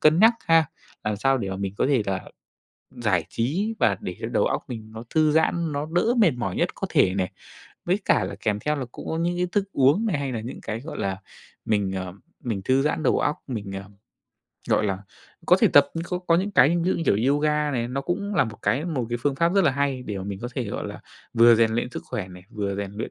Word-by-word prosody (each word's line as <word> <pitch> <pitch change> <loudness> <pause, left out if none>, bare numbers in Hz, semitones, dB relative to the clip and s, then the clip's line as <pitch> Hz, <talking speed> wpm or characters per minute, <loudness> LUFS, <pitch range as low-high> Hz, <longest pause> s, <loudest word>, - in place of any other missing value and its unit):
cân 155 +1 +5
nhắc 225 +4 +7
ha. 165 -1 +5 0.4
Làm 105 -1 -1
sao 135 +5 +2
để 100 -5 -3
mà 95 - -3
mình 100 0 -3
có - - +2
thể 135 -5 +2
là 95 -1 -1 0.7
giải 95 -9 0
trí 175 - -1
và 100 -3 +3
để 90 - -5
cho - - -2
đầu - - +2
óc - - -1
mình 110 -3 -7
nó 110 +1 -8
thư 155 -1 +3
giãn, 160 +1 +2
nó 145 +1 -2
đỡ 225 +7 +3
mệt 210 -8 +5
mỏi 110 -7 -3
nhất - - 0
có - - -3
thể 90 - +3
này. 95 -2 -1 0.5
Với 185 +4 +1
cả - - +3
là - - -4
kèm 105 -1 0
theo 150 +6 0
là 135 -3 -3
cũng - - -9
có 160 - -2
những 175 +1 0
cái 180 - 0
thức 200 0 0
uống 140 - +4
này 195 -9 +1
hay 140 -2 -2
là 120 - -3
những 115 +4 -7
cái, 110 +1 -4
gọi 150 +2 -7
là, 95 -1 -2 0.5
mình, 105 -3 +1
ờ, 95 -1 -4 0.3
mình 110 -6 -2
thư 130 +1 +3
giãn 150 +2 0
đầu - - +3
óc, 150 - +1
mình, 110 -7 -5
ờ, 95 0 -5 0.9
gọi - - +3
là, 95 -2 -1 0.5
có - - +6
thể - - +6
tập 145 -1 +7
nhưng 165 0 -3
khô 180 0 -3
có 175 -2 +2
những 190 +4 0
cái 135 -8 +6
ví 170 +1 +1
dụ - - +2
như - - -2
kiểu 120 +8 +3
yoga 150 0 +1
này, 120 -4 -1
nó 130 +2 -2
cũng 200 +7 -3
là 180 - +4
một 110 -1 -7
cái 140 +5 +1
một 145 -9 -2
cái 120 0 -2
phương 145 0 +1
pháp 170 +4 +2
rất 195 -2 +4
là - - +5
hay 135 -1 -1
để 105 -5 -5
mà 95 - -5
mình 100 -1 -5
có 120 - -3
thể, 130 - -2
gọi 100 - -4
là, - - -8 0.3
vừa 115 +1 +7
rèn 115 0 +3
luyện 120 +2 -1
sức - - -6
khỏe 95 -3 -4
này, 90 -1 -12
vừa 100 -2 -3
rèn 100 -1 -4
luyện, 110 +2 -5
130 Hz, 265 wpm, -24 LUFS, 105-160 Hz, 0.9 s, nhắc